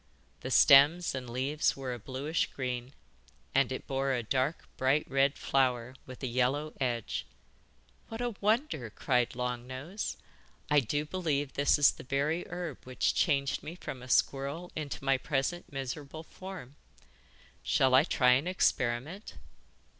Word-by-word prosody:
The -, -, -6 dB
stems 150 Hz, +6 st, +6 dB
and 130 Hz, -2 st, -5 dB
leaves 135 Hz, +6 st, 0 dB
were 130 Hz, -2 st, -4 dB
a 120 Hz, -, -6 dB
bluish 135 Hz, +8 st, -2 dB
green, 125 Hz, 0 st, -4 dB, 0.6 s
and 135 Hz, -1 st, +3 dB
it 130 Hz, -, -4 dB
bore 135 Hz, 0 st, 0 dB
a 120 Hz, -2 st, -1 dB
dark, 130 Hz, +7 st, -1 dB
bright 135 Hz, +3 st, +2 dB
red 135 Hz, +1 st, +2 dB
flower 125 Hz, -2 st, +1 dB
with 130 Hz, +1 st, -10 dB
a -, -, 0 dB
yellow 130 Hz, +5 st, 0 dB
edge. 120 Hz, -4 st, -1 dB, 0.9 s
'What 225 Hz, -, -6 dB
a 245 Hz, -1 st, -1 dB
wonder!' 210 Hz, -, +1 dB
cried 125 Hz, +2 st, 0 dB
Long 125 Hz, 0 st, -3 dB
Nose. 150 Hz, +11 st, -5 dB, 0.5 s
'I 150 Hz, -, +6 dB
do 145 Hz, +4 st, -1 dB
believe 150 Hz, -5 st, -1 dB
this 140 Hz, +2 st, +3 dB
is 145 Hz, -2 st, +6 dB
the -, -, -11 dB
very 140 Hz, +6 st, -1 dB
herb 175 Hz, -4 st, -5 dB
which 130 Hz, -1 st, 0 dB
changed 140 Hz, -5 st, +1 dB
me 165 Hz, -, -7 dB
from 130 Hz, -7 st, -7 dB
a 125 Hz, -, -10 dB
squirrel 140 Hz, +7 st, 0 dB
into 145 Hz, -3 st, -5 dB
my 135 Hz, -1 st, +3 dB
present 145 Hz, +6 st, -2 dB
miserable 140 Hz, +3 st, -5 dB
form. 180 Hz, -7 st, -10 dB, 0.8 s
Shall 130 Hz, -1 st, +2 dB
I 130 Hz, +2 st, +7 dB
try 125 Hz, -6 st, +3 dB
an 135 Hz, +7 st, +3 dB
experiment? 155 Hz, -, -1 dB
135 Hz, 150 wpm, -31 LUFS, 130-155 Hz, 0.9 s, I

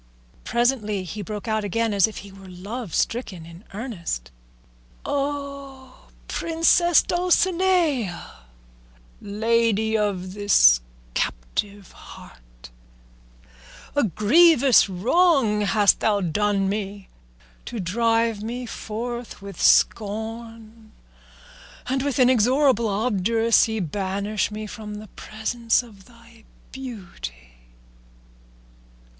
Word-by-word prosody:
Presently 230 Hz, -4 st, 0 dB
he 205 Hz, +4 st, -6 dB
broke 210 Hz, +3 st, -6 dB
out 220 Hz, -1 st, 0 dB
again, 225 Hz, +2 st, -1 dB
as 200 Hz, -1 st, +4 dB
if 220 Hz, -, -9 dB
he 200 Hz, -, -12 dB
were 195 Hz, -1 st, -13 dB
love 200 Hz, +3 st, -7 dB
stricken 200 Hz, -8 st, -2 dB
in 170 Hz, +3 st, -13 dB
earnest, 185 Hz, -, -5 dB, 0.7 s
"O 280 Hz, -2 st, -5 dB, 0.2 s
Princess 335 Hz, +1 st, +3 dB
Dulcinea, 350 Hz, -, +1 dB, 0.8 s
lady 220 Hz, +1 st, +1 dB
of 195 Hz, -4 st, -1 dB
this 120 Hz, -, +5 dB, 0.3 s
captive 190 Hz, -, -3 dB
heart, -, -, -15 dB, 1.2 s
a 290 Hz, -, +3 dB
grievous 255 Hz, -, +5 dB
wrong 235 Hz, -, +2 dB
hast 205 Hz, 0 st, +3 dB
thou 210 Hz, -2 st, +1 dB
done 200 Hz, +2 st, 0 dB
me 200 Hz, -1 st, -4 dB, 0.6 s
to 235 Hz, -, -6 dB
drive 225 Hz, +3 st, 0 dB
me 240 Hz, +3 st, -5 dB
forth 235 Hz, +2 st, -6 dB
with 200 Hz, -1 st, -9 dB
scorn, 225 Hz, +1 st, 0 dB, 0.9 s
and 265 Hz, +1 st, -1 dB
with 280 Hz, -2 st, -2 dB
inexorable 255 Hz, 0 st, +3 dB
obduracy 220 Hz, +1 st, +1 dB
banish 200 Hz, +4 st, -2 dB
me 215 Hz, +1 st, -6 dB
from 210 Hz, 0 st, -8 dB
the 210 Hz, -1 st, -10 dB
presence 230 Hz, +2 st, -1 dB
of 205 Hz, -5 st, -16 dB
thy 230 Hz, -1 st, -19 dB, 0.3 s
beauty. 175 Hz, -, -9 dB
220 Hz, 95 wpm, -23 LUFS, 200-245 Hz, 1.2 s, this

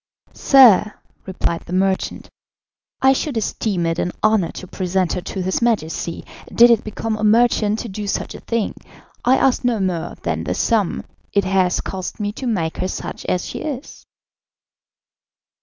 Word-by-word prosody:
"Sir," 235 Hz, -6 st, +6 dB, 0.3 s
replied 175 Hz, -3 st, -2 dB
the 175 Hz, -, -6 dB
merchant, 190 Hz, 0 st, -1 dB, 0.8 s
"I 265 Hz, 0 st, +6 dB
should 270 Hz, -1 st, -2 dB
esteem 200 Hz, -4 st, -1 dB
it 165 Hz, 0 st, -1 dB
an 180 Hz, -, -1 dB
honour 215 Hz, -5 st, +3 dB
to -, -, -8 dB
present 185 Hz, -1 st, -1 dB
her 180 Hz, -, -2 dB
to 185 Hz, +1 st, -5 dB
his 185 Hz, +5 st, -1 dB
Majesty, 170 Hz, -7 st, -1 dB, 0.3 s
did 240 Hz, +1 st, +7 dB
it 230 Hz, -1 st, +3 dB
become 220 Hz, 0 st, -3 dB
a 215 Hz, -, -5 dB
merchant 220 Hz, -1 st, +3 dB
to -, -, -6 dB
do 205 Hz, 0 st, -6 dB
such -, -, -2 dB
a -, -, -9 dB
thing. 230 Hz, -3 st, -2 dB, 0.5 s
I 255 Hz, +2 st, +4 dB
ask 265 Hz, -1 st, +2 dB
no 245 Hz, -3 st, +1 dB
more 175 Hz, -3 st, -2 dB
than -, -, -2 dB
the -, -, -2 dB
sum 220 Hz, -6 st, 0 dB, 0.3 s
it 200 Hz, -, +3 dB
has 185 Hz, -1 st, +1 dB
cost 185 Hz, +2 st, -6 dB
me 205 Hz, -1 st, -1 dB
to 255 Hz, +4 st, -6 dB
make 170 Hz, -8 st, -1 dB
her 185 Hz, -, -1 dB
such -, -, -6 dB
as 180 Hz, -, -1 dB
she -, -, -6 dB
is." 285 Hz, -2 st, -7 dB
205 Hz, 170 wpm, -20 LUFS, 185-230 Hz, 0.8 s, did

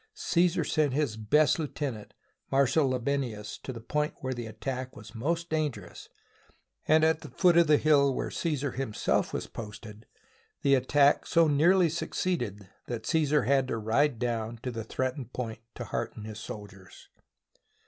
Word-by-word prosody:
Caesar 175 Hz, 0 st, +2 dB
sent 150 Hz, -4 st, +1 dB
his 140 Hz, -6 st, 0 dB
best 145 Hz, +10 st, +3 dB
lieutenant, 140 Hz, -8 st, -4 dB
the -, -, -31 dB, 0.4 s
Marshal 140 Hz, +1 st, +3 dB
Labienus, 125 Hz, -5 st, -2 dB
to -, -, -6 dB
the 120 Hz, -, -7 dB
point 150 Hz, +6 st, -2 dB
where 130 Hz, -1 st, -2 dB
the 120 Hz, -2 st, -5 dB
attack 130 Hz, +4 st, -5 dB
was 105 Hz, 0 st, -12 dB
most 165 Hz, +8 st, -2 dB
dangerous, 155 Hz, -5 st, -3 dB, 0.8 s
and 155 Hz, +1 st, +5 dB
at 160 Hz, 0 st, +3 dB
the -, -, -9 dB
foot 180 Hz, -3 st, +3 dB
of 170 Hz, -1 st, +6 dB
the 150 Hz, -1 st, +6 dB
hill 145 Hz, -2 st, +4 dB
where -, -, -3 dB
Caesar 145 Hz, -5 st, -1 dB
himself 125 Hz, -5 st, -1 dB
was -, -, -3 dB
posted, 105 Hz, 0 st, -9 dB, 0.6 s
the 140 Hz, -, +4 dB
attack 140 Hz, +2 st, +3 dB
so 165 Hz, -2 st, +4 dB
nearly 170 Hz, +5 st, +4 dB
succeeded 125 Hz, -, -2 dB, 0.2 s
that 115 Hz, -2 st, -5 dB
Caesar 150 Hz, -2 st, +2 dB
had 135 Hz, -2 st, +2 dB
to 115 Hz, -, -2 dB
ride 115 Hz, +5 st, +1 dB
down 115 Hz, -1 st, -2 dB
to 125 Hz, -, -2 dB
the 115 Hz, -1 st, -5 dB
threatened 130 Hz, +2 st, -3 dB
point 115 Hz, -3 st, -4 dB, 0.2 s
to -, -, -5 dB
hearten 110 Hz, -, -4 dB
his 110 Hz, 0 st, -7 dB
soldiers. 100 Hz, -3 st, -10 dB
135 Hz, 160 wpm, -29 LUFS, 115-150 Hz, 0.8 s, of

